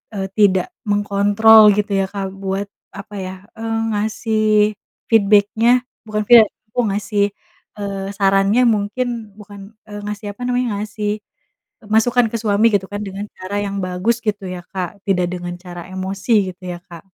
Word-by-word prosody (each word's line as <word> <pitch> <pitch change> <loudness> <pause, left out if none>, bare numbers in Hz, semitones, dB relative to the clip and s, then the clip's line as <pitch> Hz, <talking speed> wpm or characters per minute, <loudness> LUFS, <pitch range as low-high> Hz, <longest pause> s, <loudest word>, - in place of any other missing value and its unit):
eee, 195 -1 -2
tidak 190 -3 +4 0.2
mengkontrol 205 +2 +5
gitu 210 0 -1
ya, 195 -1 +2
Kak, 195 -2 -4
buat, 195 +1 -3 0.3
apa 200 +1 -9
ya, 185 0 -6 0.2
eee, 225 0 -2
ngasih 215 +1 -1 0.7
feedback-nya 220 +3 +4 0.2
bukan 215 0 -1
feedba 235 -3 +8 0.2
aku 245 - 0
ngasih, 205 0 0 0.6
eee, 195 -1 -4
sarannya, 195 +4 +3
mungkin 225 0 -1
bukan, 205 0 -12
eee, 205 0 -7
ngasih, 210 0 -5
apa 250 - -15
namanya, 250 0 0
ngasih 210 0 -3 0.7
masukan 235 +3 +3
ke - - 0
suami 210 0 +2
gitu 195 -2 +2
kan 205 - -3
dengan 195 +1 -6
cara 185 +2 -5
yang 200 0 -3
bagus 185 +6 0
gitu 210 -2 -2
ya, 180 -1 -5
Kak, 185 0 -5
tidak 180 -2 +2
dengan 175 -1 -5
cara 175 -1 -9
emosi 190 +3 -3 0.2
gitu 185 +1 -36
ya, 175 - -7
Kak. 170 0 -11
205 Hz, 155 wpm, -19 LUFS, 195-220 Hz, 0.7 s, feedba